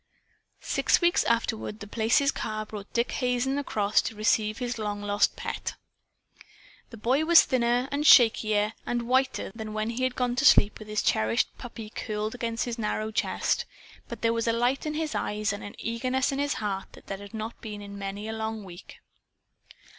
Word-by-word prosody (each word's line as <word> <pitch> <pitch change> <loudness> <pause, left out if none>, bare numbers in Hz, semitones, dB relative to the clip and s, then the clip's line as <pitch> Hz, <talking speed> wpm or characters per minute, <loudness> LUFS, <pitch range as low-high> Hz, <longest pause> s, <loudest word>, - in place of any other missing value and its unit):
Six - - +2
weeks 345 0 +3
afterward 220 -2 -1
The 205 - -7
Place's 225 +6 +2
car 215 0 -4
brought 210 -2 -9
Dick 235 +1 0
Hazen 250 +2 0
across 210 -7 +1
to 225 - -5
receive 215 0 +1
his 245 -2 -3
long 205 -1 -3
lost 205 0 +2
pet. - - -4 1.1
The 230 - -11
boy 255 +7 +1
was 335 +1 +8
thinner 245 0 +1
and 285 +1 -1
shakier 215 -6 +5
and 240 -1 -2
whiter 260 -2 +1
than 220 -1 -6
when 215 +1 -1
he 240 +2 -4
had 255 -1 0
gone 245 -1 0
to 270 - +1
sleep 215 -7 +5
with 215 - -10
his 215 0 -1
cherished 110 +1 +1
puppy 225 -3 -8
curled 215 0 -3
against 230 -2 -2
his 240 -1 -4
narrow 215 0 -2
chest. - - 0 0.4
But 235 -1 -8
there 230 0 +3
was 230 0 -1
a 230 - +3
light 245 +5 0
in 305 - -2
his 315 -1 -2
eyes 210 -1 -1
and 205 - -7
an 205 - -8
eagerness 255 +4 -1
in 275 - -2
his 285 0 0
heart 195 -3 -4
that 195 - -5
had 205 +2 -10
not 220 +1 -6
been 210 -2 -7
there - - -8
in 200 0 -9
many 200 +2 -5
a 220 - -3
long 220 -1 -4
week. 175 -2 -12
225 Hz, 190 wpm, -27 LUFS, 210-250 Hz, 1.1 s, was